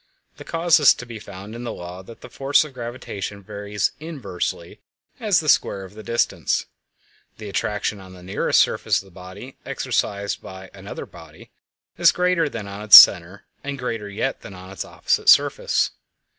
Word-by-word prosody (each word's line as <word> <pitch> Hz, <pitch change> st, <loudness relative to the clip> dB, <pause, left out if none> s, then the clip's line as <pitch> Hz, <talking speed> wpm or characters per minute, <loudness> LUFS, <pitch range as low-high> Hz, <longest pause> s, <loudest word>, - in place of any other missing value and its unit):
The -, -, -10 dB
cause 165 Hz, 0 st, +2 dB
is 145 Hz, -, +6 dB
to 125 Hz, -, -9 dB
be 115 Hz, -2 st, -9 dB
found 100 Hz, +1 st, -10 dB
in 120 Hz, +1 st, -7 dB
the 120 Hz, -, -4 dB
law 90 Hz, 0 st, -8 dB
that 115 Hz, +4 st, -14 dB
the -, -, -11 dB
force 140 Hz, +2 st, +2 dB
of 150 Hz, -3 st, -11 dB
gravitation 115 Hz, -5 st, -7 dB
varies 100 Hz, +1 st, -3 dB
inversely 110 Hz, -, -5 dB, 0.4 s
as -, -, +2 dB
the -, -, -7 dB
square 95 Hz, -, +2 dB
of 95 Hz, -, -12 dB
the 110 Hz, -, -10 dB
distance; 115 Hz, +2 st, -1 dB, 0.7 s
the 110 Hz, -, -9 dB
attraction 100 Hz, +2 st, -2 dB
on 95 Hz, -1 st, -13 dB
the 90 Hz, -1 st, -14 dB
nearest 95 Hz, +2 st, +1 dB
surface -, -, +2 dB
of -, -, -11 dB
the 95 Hz, -, -18 dB
body 95 Hz, +8 st, -11 dB
exercised 100 Hz, -1 st, -2 dB
by 95 Hz, 0 st, -11 dB
another -, -, -8 dB
body -, -, -15 dB, 0.5 s
is -, -, +6 dB
greater 180 Hz, -3 st, +1 dB
than 110 Hz, -6 st, -7 dB
on 100 Hz, +1 st, -8 dB
its 105 Hz, -1 st, +11 dB
center, 90 Hz, +2 st, +6 dB, 0.2 s
and 140 Hz, -1 st, -5 dB
greater 115 Hz, -5 st, -4 dB
yet 100 Hz, -, -3 dB
than 95 Hz, -, -11 dB
on 95 Hz, +1 st, -12 dB
its 95 Hz, -, -5 dB
opposite -, -, 0 dB
surface. -, -, +3 dB
105 Hz, 180 wpm, -22 LUFS, 95-120 Hz, 0.7 s, its